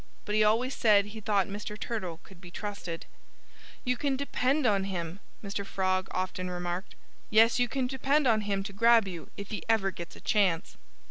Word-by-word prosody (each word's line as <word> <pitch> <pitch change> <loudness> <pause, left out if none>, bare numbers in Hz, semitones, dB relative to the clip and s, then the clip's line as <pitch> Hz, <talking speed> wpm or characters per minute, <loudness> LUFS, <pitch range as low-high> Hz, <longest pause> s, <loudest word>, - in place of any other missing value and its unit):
But 210 - -3
he 215 0 +4
always 235 +5 +2
said 205 -3 +5
he 210 +2 -8
thought 200 -2 +2
Mr. 210 +1 -6
Turtle 185 -8 -4
could 185 -3 -16
be 175 - -10
trusted. 190 -3 -5 0.8
"You 250 0 +1
can 275 0 0
depend 280 +1 +1
on 200 -4 +3
him," 175 -1 -4 0.2
Mr. 200 0 -3
Frog 185 -1 0
often 185 0 -3
remarked. 180 +2 -4 0.3
"Yes, 225 +2 +5
you 245 - +3
can 260 +2 -1
depend 275 +3 +1
on 225 -3 +4
him 200 -2 -1
to 200 0 -7
grab 230 0 +5
you 175 -4 -7
if 200 0 -7
he 215 - -3
ever 205 -4 +3
gets 170 -2 -8
a - - -12
chance." 190 -6 +1
205 Hz, 190 wpm, -29 LUFS, 185-230 Hz, 0.8 s, said